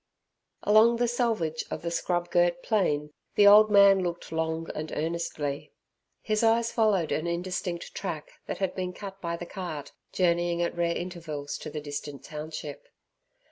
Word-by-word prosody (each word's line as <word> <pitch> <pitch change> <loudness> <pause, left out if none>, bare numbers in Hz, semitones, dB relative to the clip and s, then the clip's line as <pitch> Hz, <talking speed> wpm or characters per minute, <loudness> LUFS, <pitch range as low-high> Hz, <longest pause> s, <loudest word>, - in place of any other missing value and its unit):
Along 220 +3 +6
the 240 0 +2
selvage 225 -10 0
of - - -5
the 170 - -2
scrub 175 0 -1
girt 175 0 +2
plain 150 -9 0 0.2
the 205 - +6
old 210 +1 +8
man 200 -2 +7
looked 175 -2 -4
long 160 0 -2
and 155 +1 -5
earnestly. 155 -3 -3 0.5
His 215 -1 0
eyes 230 0 +3
followed 205 -8 +2
an 155 - -1
indistinct 175 0 -3
track 170 -6 -5 0.2
that - - -3
had 190 -2 -1
been 180 -1 -3
cut 195 0 -9
by 170 -1 -2
the 175 - -6
cart, 175 -6 -6 0.2
journeying 175 -1 +1
at 170 - -2
rare 170 -1 0
intervals 165 -5 -5
to - - -6
the 150 - -5
distant 145 -1 -6
township. 150 -1 -7
175 Hz, 160 wpm, -28 LUFS, 160-195 Hz, 0.5 s, old